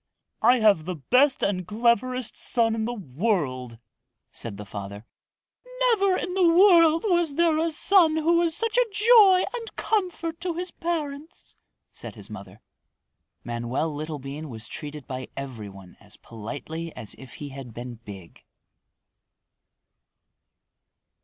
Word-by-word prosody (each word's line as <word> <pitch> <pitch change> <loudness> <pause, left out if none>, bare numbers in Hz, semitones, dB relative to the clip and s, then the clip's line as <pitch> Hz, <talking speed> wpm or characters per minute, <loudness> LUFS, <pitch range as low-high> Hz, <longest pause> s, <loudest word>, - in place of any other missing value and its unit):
"I 245 +3 +5
have 200 -8 +4
the 180 0 -3
best 255 - +2
and 185 -3 -1
cleverest 235 +3 0
son 230 -2 +1
in 220 -1 -2
the 240 +1 -3
world," 140 - -2 0.5
said 110 -4 -6
the 105 - -8
father. 100 +1 -8 0.9
"Never 395 -4 +2
in 360 - -4
the 360 -3 +4
world 335 -3 +6
was 345 -6 +1
there 330 -1 +3
a 330 +1 +1
son 325 0 +5
who 335 +2 +3
was 335 -2 +1
such 455 +1 +1
a - - +2
joy 415 -3 +6
and 465 -2 -6
comfort 355 -6 -2
to 355 -2 -2
his 360 +1 -4
parents," 315 -3 -5 0.4
said - - -8
his - - -11
mother. - - -10 0.8
Manoel 120 +6 -3
Littlebean 150 0 -6
was 110 -2 -6
treated 150 -2 -8
by 130 -1 -6
every 125 -7 -6
one 95 -2 -14
as 105 -1 -16
politely 145 +9 -7
as 110 - -6
if 130 -2 -11
he 145 - -8
had 135 -3 -9
been 120 +2 -7
big. 95 -6 -11
220 Hz, 140 wpm, -25 LUFS, -, 0.9 s, world